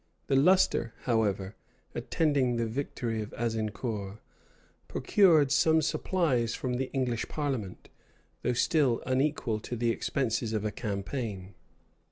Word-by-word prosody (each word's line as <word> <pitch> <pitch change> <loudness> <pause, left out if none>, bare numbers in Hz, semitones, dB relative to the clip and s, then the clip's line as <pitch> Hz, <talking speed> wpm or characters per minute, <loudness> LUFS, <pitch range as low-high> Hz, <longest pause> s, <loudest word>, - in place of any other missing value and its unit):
The 135 - +1
lustre, 135 -6 +3
however, 105 -4 0 0.4
attending 140 -6 +1
the 115 0 0
victory 115 -2 -3
of 105 - -7
Azincour, 110 -2 -3 0.7
procured 160 -9 +4
some 160 +3 +4
supplies 135 -8 0
from 125 -2 -2
the 130 0 -3
English 125 -4 -1
parliament; 130 -11 -3 0.5
though 125 - 0
still 130 -1 +2
unequal 130 -4 0
to 120 - -5
the 120 0 +1
expenses 115 -2 -1
of 110 -1 -1
a 105 - 0
campaign. 100 -2 -4
120 Hz, 120 wpm, -29 LUFS, 110-140 Hz, 0.7 s, procured